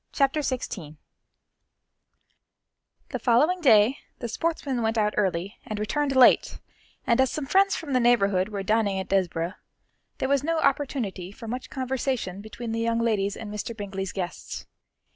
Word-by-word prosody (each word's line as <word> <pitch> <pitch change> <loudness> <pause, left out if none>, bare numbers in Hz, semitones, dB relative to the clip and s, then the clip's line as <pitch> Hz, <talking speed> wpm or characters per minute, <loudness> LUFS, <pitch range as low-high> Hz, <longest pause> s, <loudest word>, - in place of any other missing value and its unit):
Chapter 275 +1 +2
XVI 200 - -4 2.1
The - - -3
following 300 +10 +3
day 230 -2 +5 0.2
the 240 - -4
sportsmen 275 -1 -2
went 225 0 0
out 210 -1 +2
early 190 0 -1
and 215 - -5
returned 270 +6 -1
late, 255 -2 +5 0.5
and 235 0 +3
as 265 - +3
some 300 +2 -3
friends 390 +6 +3
from 295 -4 -5
the 255 - +4
neighbourhood 200 -6 +3
were 200 -2 -4
dining 210 -1 +1
at 190 - -5
Desborough, 180 -2 0 0.6
there - - -1
was 280 0 +2
no 330 +2 0
opportunity 260 - -1
for 225 +3 -10
much 250 +3 -5
conversation 255 -7 -2
between 225 +2 -7
the 225 - -2
young 230 0 +1
ladies 210 -4 0
and 210 -1 -7
Mr. 220 +2 -5
Bingley's 195 -2 -4
guests. 180 -2 -5
230 Hz, 155 wpm, -26 LUFS, 200-265 Hz, 2.1 s, day